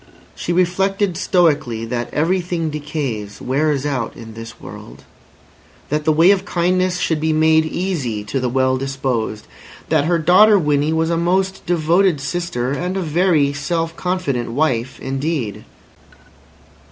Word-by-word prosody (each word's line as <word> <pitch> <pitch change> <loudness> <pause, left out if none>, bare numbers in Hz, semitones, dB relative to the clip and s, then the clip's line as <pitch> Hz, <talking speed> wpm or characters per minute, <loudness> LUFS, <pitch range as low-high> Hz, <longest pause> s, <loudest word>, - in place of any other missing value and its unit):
She - - -4
reflected 185 +2 +1
stoically 150 - +1
that 120 0 -4
everything 170 0 0
decays, 135 -9 -4
wears 140 +1 0
out, 130 -5 -2
in 115 -1 -10
this 115 0 -10
world; - - -11 0.9
that 150 +1 -1
the 155 - +4
way 165 +5 +5
of 200 -2 +1
kindness 185 +1 0
should 160 -3 0
be 160 +1 0
made 160 0 +4
easy 155 - -2
to 120 +6 -3
the 125 -1 -1
well 130 +1 +1
disposed; 130 -5 -3 0.4
that 145 - +2
her 170 +1 +2
daughter 185 +6 +6
Winnie 150 -3 +1
was 160 +1 +1
a 165 - +1
most 190 +3 0
devoted 170 0 +2
sister, 140 -4 -3
and 180 +6 -2
a - - -1
very 160 -3 +2
self 165 +3 -2
confident 175 -11 -2
wife 130 -4 -1
indeed. 135 -6 -3
155 Hz, 140 wpm, -19 LUFS, 130-175 Hz, 0.9 s, daughter